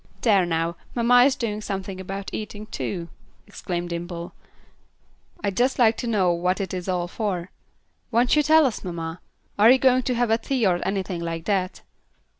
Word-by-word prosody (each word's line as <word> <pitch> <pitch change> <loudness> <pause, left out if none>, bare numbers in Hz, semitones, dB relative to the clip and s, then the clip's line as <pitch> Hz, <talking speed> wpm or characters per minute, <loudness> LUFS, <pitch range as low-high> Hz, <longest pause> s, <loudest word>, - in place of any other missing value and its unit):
"There, 200 -6 +3
now, 165 0 -1 0.2
mamma 245 +1 +5
is 275 - +3
doing 215 -3 -3
something 195 -2 -5
about 195 +1 -6
eating, 210 0 -6
too," 175 -5 -5 0.4
exclaimed 175 -4 -5
Dimple. 170 0 -5 1.1
"I'd 200 -2 -1
just 255 +4 +2
like 230 -2 +4
to 240 - -4
know 190 -6 +2
what 180 +3 0
it 195 -1 -3
is 185 0 -4
all 175 -1 -1
for. 185 -2 -3 0.6
Won't 245 +3 +3
you 300 - +5
tell 315 +1 +5
us, 245 -5 -2
mamma? 165 -2 -5 0.4
Are 215 +3 +7
you 260 - +7
going 255 -1 +4
to 250 0 -1
have 240 -1 +1
a 225 - +3
tea 250 0 0
or 180 -2 +2
anything 190 -2 -2
like 165 -1 -4
that?" 190 -3 -1
195 Hz, 180 wpm, -24 LUFS, 175-235 Hz, 1.1 s, Are